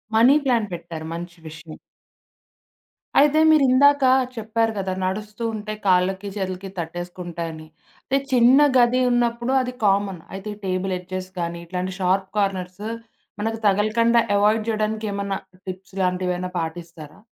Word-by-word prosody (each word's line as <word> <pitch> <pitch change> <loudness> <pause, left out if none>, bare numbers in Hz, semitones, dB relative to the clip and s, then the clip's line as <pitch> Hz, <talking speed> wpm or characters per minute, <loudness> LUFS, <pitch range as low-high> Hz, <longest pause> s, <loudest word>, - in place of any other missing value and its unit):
Money 245 +6 +6
plant 235 -5 +1
పెట్టారు. 165 -2 -7
మంచి 175 +1 -7
విషయం. 155 0 -11 1.4
అయితే 295 +2 +5
మీరిందాక 285 -1 +5 0.3
చెప్పారు 225 0 0
గదా! 190 -1 -2
నడుస్తూ 210 +4 -4
ఉంటే, 215 0 -5
కాళ్ళకి 190 +2 +2
చేతులకి 190 -1 -4
తట్టేసుకుంటాయని. 170 -1 -6 0.6
చిన్న 250 +2 +6 0.2
గది 245 +1 +4
ఉన్నప్పుడు 240 +1 +1
అది 250 0 -4
కామన్. 195 -3 +1
అయితే 195 +2 -7
ఈ 205 - -20
టేబుల్ 185 0 -1
ఎడ్జెస్ 185 +1 -6
గానీ, 170 0 -3
ఇట్లాంటి 185 +1 -3
షార్ప్ 190 +1 +1
కార్నర్స్, 195 0 -2 0.6
మనకు 225 +1 -1
తగలకండా 215 +4 +3 0.2
అవాయిడ్ 215 +2 +2
జేయడానికేమన్నా 215 -2 -2 0.3
టిప్స్ 190 +1 -8
లాంటివేవన్నా 180 0 -1
పాటిస్తారా? 165 0 -7
195 Hz, 120 wpm, -23 LUFS, 180-225 Hz, 1.4 s, Money